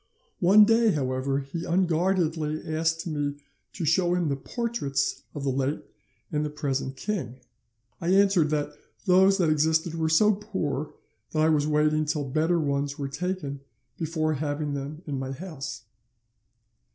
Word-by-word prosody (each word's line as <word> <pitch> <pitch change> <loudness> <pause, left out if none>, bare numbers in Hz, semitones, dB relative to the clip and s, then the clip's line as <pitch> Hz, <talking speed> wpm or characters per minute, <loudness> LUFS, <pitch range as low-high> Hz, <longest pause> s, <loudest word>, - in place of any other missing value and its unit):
"'One 200 +4 +7
day, 225 +1 +4
however, 135 0 -1
he 140 +5 -6
unguardedly 170 -3 +1
asked 165 +1 0
me 145 -3 -2 0.4
to 175 - -3
show 175 +3 +3
him 175 -4 0
the 140 - 0
portraits 145 - -2
of 145 - -4
the 135 - +1
late 135 +3 -1 0.5
and 150 0 0
the 150 - -2
present 135 -3 -2
king. 185 - -3 0.7
I 170 - -3
answered 195 -4 +4
that 150 -1 -1 0.3
those 190 +1 +5
that 170 -5 +2
existed 160 +2 +2
were 160 -1 0
so 210 +7 +5
poor 165 -9 -3 0.4
that 155 -1 +2
I 160 - +4
was 150 -2 +2
waiting 155 0 +2
till 150 -1 -1
better 160 +5 +1
ones 140 -1 -1
were 140 -1 -3
taken 155 -3 -3 0.4
before 155 -1 -1
having 145 0 -2
them 145 +4 -5
in 140 -3 -3
my 135 0 -4
house. 135 -8 -7
155 Hz, 150 wpm, -26 LUFS, 145-175 Hz, 0.7 s, One